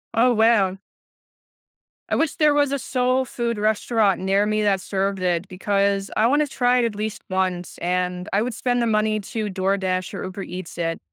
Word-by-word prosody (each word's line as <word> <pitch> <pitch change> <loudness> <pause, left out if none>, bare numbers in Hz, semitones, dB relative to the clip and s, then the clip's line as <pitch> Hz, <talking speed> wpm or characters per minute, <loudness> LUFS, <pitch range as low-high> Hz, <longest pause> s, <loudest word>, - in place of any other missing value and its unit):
Oh, 245 +2 +4
wow. 220 -4 +3 1.3
I - - +1
wish 320 -1 0
there 300 -2 +4
was 290 -1 +2
a 280 - -1
soul 255 +1 +1
food 235 -2 -3
restaurant 215 -1 +1
near 195 +2 +2
me 215 0 0
that 195 -2 +2
served 195 0 -2
it, 180 0 0
because 200 +1 0
I 220 - +4
wanna 290 +3 +2
try 250 -1 +2
it 235 - +2
at 225 - -2
least 215 +1 -4
once, 185 -2 -2
and 180 +1 -2
I 200 - +3
would 240 0 -2
spend 245 -1 0
the 235 - +1
money 215 0 +1
to 215 +2 -4
DoorDash 185 -1 -1
or - - -5
Uber 190 +1 -6
Eats 180 -2 -8
it. 165 -1 -2
205 Hz, 190 wpm, -22 LUFS, 185-235 Hz, 1.3 s, Oh